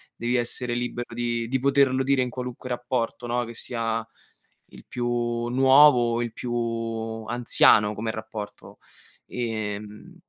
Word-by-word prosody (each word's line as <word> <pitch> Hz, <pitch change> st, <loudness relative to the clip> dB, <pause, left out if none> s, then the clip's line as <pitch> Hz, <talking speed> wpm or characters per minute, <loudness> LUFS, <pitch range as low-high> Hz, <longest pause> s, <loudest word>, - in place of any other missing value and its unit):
Devi 120 Hz, +2 st, -1 dB
essere 120 Hz, 0 st, 0 dB
libero 120 Hz, 0 st, -4 dB
di 120 Hz, -1 st, -2 dB
di 130 Hz, -, 0 dB
poterlo 135 Hz, -1 st, +3 dB
dire 135 Hz, 0 st, +2 dB
in 125 Hz, -, -1 dB
qualunque 125 Hz, 0 st, -6 dB
rapporto, 120 Hz, -1 st, -2 dB
no, 120 Hz, +1 st, 0 dB
che 115 Hz, 0 st, -8 dB
sia 115 Hz, -1 st, -3 dB, 0.6 s
il 60 Hz, -2 st, -14 dB
più 120 Hz, -1 st, -2 dB
nuovo 130 Hz, -1 st, +6 dB
o 120 Hz, -, 0 dB
il 120 Hz, -1 st, -3 dB
più 120 Hz, +1 st, -5 dB, 0.7 s
anziano 110 Hz, -3 st, +4 dB
come 110 Hz, +2 st, -3 dB
rapporto, 110 Hz, -2 st, -8 dB, 0.5 s
ehm, 105 Hz, -3 st, -5 dB
120 Hz, 135 wpm, -25 LUFS, 115-125 Hz, 0.7 s, nuovo